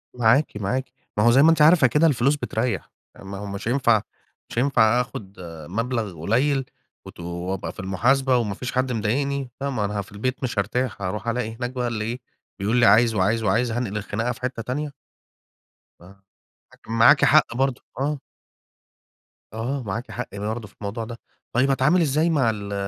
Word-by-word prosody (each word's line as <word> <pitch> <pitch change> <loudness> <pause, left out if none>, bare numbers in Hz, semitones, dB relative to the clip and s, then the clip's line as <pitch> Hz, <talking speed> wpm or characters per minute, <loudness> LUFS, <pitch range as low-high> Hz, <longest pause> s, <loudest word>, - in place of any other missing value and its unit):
معاكِ، 125 +2 +3
معاكِ. 125 +7 -2 0.3
ما 105 - +3
هو 120 - +6
زَي 135 +3 +6
ما 165 - +7
أنتِ 160 -2 +3
عارفة 155 -3 +7
كده 150 +6 +3
الفلوس 140 0 +2
بترّيح. 115 -6 -2 0.3
ما 95 0 -8
هو 105 - -6
مش 100 +2 -6
هينفع 120 -4 +3 0.5
مش - - -10
هينفع 125 -3 +4
آخد 105 -6 -8 0.3
مبلغ 110 -4 -3
قليل 135 - +1 0.4
وت - - -12
وأبقى 85 +2 -4
في - - -15
المحاسبة 125 +8 +2
وما 105 -5 -1
فيش 125 - -5
حد 130 0 0
مضايقني. 135 +4 -1
فما 130 -7 -1
أنا 105 0 -2
في 100 - -13
البيت 130 +6 -3
مش 120 -5 -1
هارتاح، 125 +3 -2
هارُوح 100 +3 -4
ألاقي 115 -1 -2
هناك 120 +1 -3
بقى 125 -1 -2
اللي 110 -2 -2
إيه، 120 +2 -4 0.4
بيقول 105 +4 0
لي 120 - +5
عايز، 110 +3 +5
وعايز، 105 +3 +1
وعايز، 115 +4 +1
هانقل 110 -3 -2
الخناقة 110 +3 -2
في 120 - -9
حتّة 125 -2 -3
تانية؟ 145 +4 -3 1.1
آه، 95 +2 -17 0.5
لكن - - -13
معاكِ 115 0 +6
حق 115 - +4
برضه. 135 -1 0 0.2
آه. 145 +1 -1 1.3
آه، 125 +5 -3
معاكِ 110 +4 -5
حق 120 -4 -6
برضه 110 +2 -4
في - - -23
الموضوع 105 +3 -4
ده. 115 +1 -7 0.4
طيب 130 +3 +3
أتعامل 145 +7 +3
إزاي 155 +2 +2
مع 135 -8 +2
ال 100 -2 -4
120 Hz, 180 wpm, -23 LUFS, 105-130 Hz, 1.3 s, ما